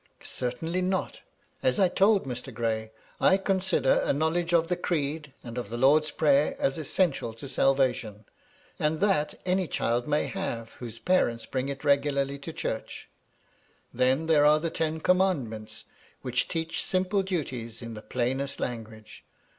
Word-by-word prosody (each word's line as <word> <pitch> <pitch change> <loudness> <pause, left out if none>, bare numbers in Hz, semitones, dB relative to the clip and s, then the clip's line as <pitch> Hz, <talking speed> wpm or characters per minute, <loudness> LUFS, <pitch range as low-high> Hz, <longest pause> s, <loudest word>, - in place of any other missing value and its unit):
" - - -42
Certainly 160 +9 -2
not. 185 +1 -2 0.4
As 130 - +2
I 190 - +6
told 195 +1 +3
Mr. 125 -2 -5
Gray, 110 -2 -2 0.3
I 190 - +5
consider 190 -8 +2
a - - +1
knowledge 160 +4 0
of 165 -1 +3
the 180 - 0
Creed, 155 -4 -2
and 120 0 -5
of 120 - -6
the 120 - -4
Lord's 150 +5 +4
Prayer, 145 -1 +3
as 135 +3 0
essential 140 -7 0
to 125 +5 -9
salvation; 125 -6 +1 0.5
and 155 +1 +1
that 190 -7 +1
any 185 0 +1
child 120 -3 -1
may 150 0 +1
have, 115 -13 -4
whose 115 -2 -7
parents 120 -7 +1
bring 130 +1 -2
it 140 0 -5
regularly 140 -1 +1
to 150 +4 -6
church. 110 -7 -5 0.8
Then 130 +5 +2
there 155 -2 +4
are 150 +1 +6
the 165 +1 -2
Ten 160 0 -2
Commandments, 145 - 0 0.4
which 125 -1 0
teach 165 -1 -2
simple 185 +2 +1
duties 130 - -4
in 115 -1 -6
the 105 - -8
plainest 130 +4 -2
language. 110 -3 -6
140 Hz, 155 wpm, -28 LUFS, 125-170 Hz, 0.8 s, I